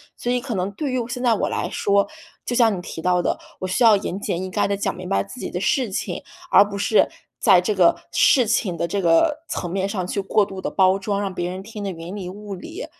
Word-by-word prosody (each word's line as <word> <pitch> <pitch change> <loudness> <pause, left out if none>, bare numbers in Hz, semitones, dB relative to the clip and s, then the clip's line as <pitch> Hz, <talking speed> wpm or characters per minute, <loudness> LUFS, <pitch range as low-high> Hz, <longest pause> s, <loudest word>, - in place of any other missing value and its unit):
所 245 - -3
以 250 - +1
可 250 -1 -5
能 185 +2 -1
对 275 +7 -3
于 250 -2 -1
现 245 +1 -5
在 240 - +4
我 215 - 0
来 - - -2
说， 200 0 +2 0.4
就 245 - -2
像 230 -4 +4
你 180 - -5
提 165 - -7
到 180 +1 +2
的， - - 0 0.2
我 185 - -3
需 190 +7 +1
要 225 -2 +8
严 195 -1 -4
简 185 -4 -2
意 185 - -4
赅 205 - +1
地 200 - 0
讲 200 - -2
明 180 0 -8
白 100 0 +1
自 100 - -11
己 - - -4
的 180 - -3
事 255 +2 +1
情， 190 - -4 0.3
而 - - +8
不 200 - -6
是 210 +2 +3 0.3
在 - - +6
这 205 +3 -1
个 180 -3 +5 0.2
事 255 -3 +5
情 210 -5 0
的 170 - -1
这 200 +4 -1
个 295 - +3
层 175 - -3
面 195 +1 -1
上 190 -3 -3
去 200 - -2
过 200 +2 +2
度 195 -1 -8
地 - - -2
包 190 0 +4
装， 200 +1 -2
让 195 -2 -3
别 175 0 -2
人 185 +1 -6
听 210 0 -8
得 195 - -2
云 170 +2 -8
里 190 -3 -5
雾 205 +1 -7
里。 335 - -7
200 Hz, 285 characters per minute, -22 LUFS, 180-220 Hz, 0.4 s, 要